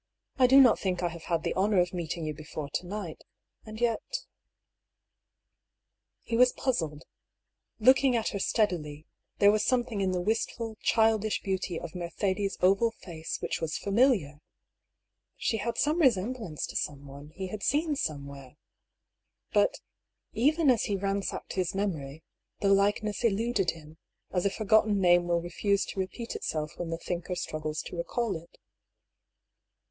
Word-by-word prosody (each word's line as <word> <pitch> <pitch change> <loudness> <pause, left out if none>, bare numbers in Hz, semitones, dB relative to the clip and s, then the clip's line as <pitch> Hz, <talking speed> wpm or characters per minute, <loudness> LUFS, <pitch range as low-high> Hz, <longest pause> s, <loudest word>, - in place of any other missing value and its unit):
" - - -44
I 255 - +7
do 265 +2 +7
not 255 -4 +6
think 185 -2 -1
I 175 - +1
have 165 -1 -10
had 165 -2 0
the - - -1
honour 195 +1 +2
of 180 0 +1
meeting 170 -1 -3
you 155 - -2
before 150 -1 -7
to 180 - -3
night. 195 -4 -6 0.4
And 215 0 -8
yet 240 - -1 0.8
" - - -57
He 230 - -2
was 250 +1 +5
puzzled. 160 - -2 0.8
Looking 260 +2 +5
at 225 -1 0
her 200 - -4
steadily, 160 -9 0 0.3
there 200 0 +6
was 210 0 +1
something 240 -5 0
in 190 - +1
the 180 - 0
wistful, 225 +3 -2
childish 220 -1 +2
beauty 190 -3 -2
of 170 - -8
Mercedes' 190 +3 -2
oval 195 +5 +4
face 165 -3 -5
which - - -2
was 160 -1 -2
familiar. 200 - +2 1.0
She 225 - 0
had 235 +2 -3
some 305 +4 +2
resemblance 225 - +1
to - - -10
someone 140 0 -5
he 190 -1 -5
had 210 +1 -6
seen 300 +4 +1
somewhere. 140 - -5 1.0
But, - - +2 0.5
even 295 +4 +3
as 235 - +1
he 205 - -1
ran 195 +1 -1
sacked - - -5
his 185 -1 -1
memory, 160 -7 -3 0.4
the 200 - +2
likeness 205 +2 +1
eluded 220 -3 +1
him, 160 -1 -7 0.3
as 180 +1 +1
a - - +2
forgot 215 +2 +3
ten 205 -2 +1
name 175 -1 +4
will 170 -1 +1
refuse 200 +4 0
to - - -6
repeat 210 +5 -4
itself 155 0 -3
when 175 -1 -3
the 165 - -2
thinker 175 +1 -4
struggles 155 -2 -3
to - - -8
recall 200 +5 -1
it. 165 +1 -11
195 Hz, 160 wpm, -29 LUFS, 165-225 Hz, 1.0 s, I